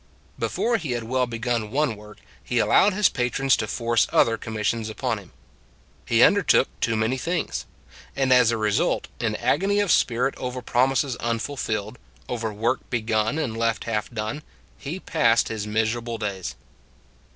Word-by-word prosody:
Before 235 0 0
he 150 - -3
had 120 -1 -3
well 125 +2 0
begun 115 -2 -2
one 140 -1 0
work, 105 0 -13 0.3
he - - -2
allowed 205 0 +4
his 205 +1 +4
patrons 130 +2 +1
to 110 - -2
force 115 +1 +1
other 115 - +4
com 110 0 -7
missions 110 +1 -1
upon 110 - -2
him. - - -16 0.8
He - - +5
undertook - - +4
too 115 - 0
many 110 +4 0
things. 170 +4 -2 0.5
And 135 -1 +3
as 125 -2 +5
a 115 - +1
result, 105 -1 0
in - - -1
agony 200 +2 +1
of 205 -5 +2
spirit 125 +1 +2
over 125 0 -5
promises 130 +2 +1
unfulfilled, 115 -2 -3 0.3
over 115 -2 -3
work 115 +5 0
begun 110 +2 0
and 130 -8 -2
left 115 0 0
half 110 -2 -2
done, 110 +5 -4 0.3
he 160 +7 -6
passed 120 -11 +2
his 105 -1 -4
miserable 115 +2 -1
days. 100 -4 -4
115 Hz, 160 wpm, -24 LUFS, 110-130 Hz, 0.8 s, He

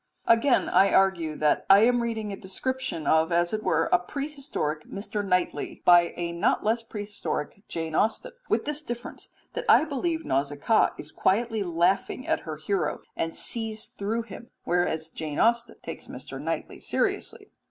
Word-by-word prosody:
Again 235 +3 +4
I 195 +1 +4
argue 175 -5 +2
that 150 0 +2
I 195 +1 +8
am 245 +1 +4
reading 220 -3 -3
a - - -3
description 195 - -4
of 160 +2 +3
as 175 +2 +2
it 215 - -1
were - - +1
a 360 - +5
prehistoric 275 - -4
Mr. 205 +1 -4
Knightley 180 -2 -1
by 175 -1 +6
a 170 -1 -2
not 170 +4 +1
less 225 +2 +1
prehistoric 205 -6 -5
Jane 160 -1 -4
Austen 225 - +1 0.2
with - - +1
this 300 0 -2
difference 240 -4 -7 0.2
that - - -4
I - - +7
believe 320 +2 -2
Nausicaa 145 +10 +2
is 150 - -8
quietly 220 +3 +1
laughing 180 +7 +1
at - - +1
her 155 - -3
hero 190 +5 -1
and 165 0 -2
sees 220 -2 -3
through 220 +4 -2
him, 235 +1 -11
whereas 160 -2 0
Jane 155 -2 -5
Austen 235 0 +2
takes - - -7
Mr. - - -8
Knightley - - -4
seriously. - - -2
200 Hz, 165 wpm, -27 LUFS, 170-235 Hz, 0.2 s, I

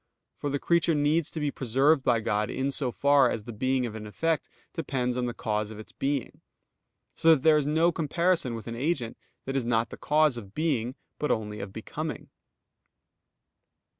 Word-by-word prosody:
For 145 - -3
the 140 - 0
creature 170 +2 +2
needs 150 +2 +2
to 160 - -5
be 150 -1 0
preserved 135 +5 +2
by 120 -3 +2
God 105 0 0
in 135 +1 -1
so 135 -2 -1
far 140 0 +4
as 110 - -3
the 120 - -8
being 130 +3 0
of 115 - -5
an 110 -1 -7
effect 160 +8 -1 0.2
depends 125 -6 -1
on 125 -1 -1
the 120 - -3
cause 105 -1 -2
of 110 - -9
its 110 - -11
being. 140 -2 -3 0.7
So 165 0 +5
that 135 - -6
there 160 -1 +6
is 145 - -2
no 160 +3 +3
comparison 165 -4 +1
with 115 - -7
an 115 - -5
agent 125 -3 -1 0.3
that 135 - -3
is 135 - +1
not 115 -1 0
the - - -7
cause 150 -4 +2
of 100 -4 -10
being 135 -6 0 0.2
but 150 - -1
only 105 -1 -1
of 100 - -5
_becoming. - - -6
135 Hz, 195 wpm, -28 LUFS, 115-150 Hz, 0.7 s, there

